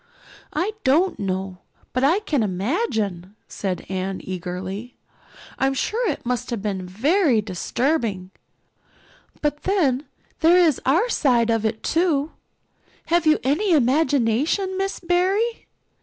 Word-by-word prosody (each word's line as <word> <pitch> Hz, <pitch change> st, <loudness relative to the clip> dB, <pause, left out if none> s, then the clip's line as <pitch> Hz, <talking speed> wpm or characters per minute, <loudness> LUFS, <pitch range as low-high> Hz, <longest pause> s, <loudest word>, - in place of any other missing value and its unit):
"I 355 Hz, +8 st, 0 dB
don't 320 Hz, +8 st, +2 dB
know, 190 Hz, -1 st, -3 dB, 0.3 s
but 255 Hz, -, 0 dB
I 335 Hz, +9 st, +3 dB
can 300 Hz, -, 0 dB
imagine," 205 Hz, -, -2 dB
said 190 Hz, -3 st, -4 dB
Anne 190 Hz, 0 st, -3 dB
eagerly. 185 Hz, +5 st, -5 dB, 0.6 s
"I'm 270 Hz, 0 st, +1 dB
sure 460 Hz, -, -1 dB
it 290 Hz, -, -4 dB
must 250 Hz, 0 st, -2 dB
have 235 Hz, -3 st, -2 dB
been 190 Hz, -3 st, -3 dB
very 270 Hz, -, +2 dB
disturbing. 210 Hz, -, -1 dB, 1.1 s
But 295 Hz, 0 st, 0 dB
then, 300 Hz, -9 st, +1 dB, 0.3 s
there 335 Hz, +2 st, +5 dB
is 330 Hz, -7 st, +3 dB
our 340 Hz, -, +3 dB
side 245 Hz, -, +2 dB
of 225 Hz, -1 st, +1 dB
it 220 Hz, 0 st, -5 dB
too. 320 Hz, -3 st, +1 dB, 0.8 s
Have 340 Hz, -1 st, +2 dB
you 310 Hz, -, +5 dB
any 335 Hz, +9 st, +2 dB
imagination, 285 Hz, -, +2 dB
Miss 390 Hz, +1 st, -2 dB
Barry? 375 Hz, +6 st, 0 dB
265 Hz, 125 wpm, -23 LUFS, 205-340 Hz, 1.1 s, there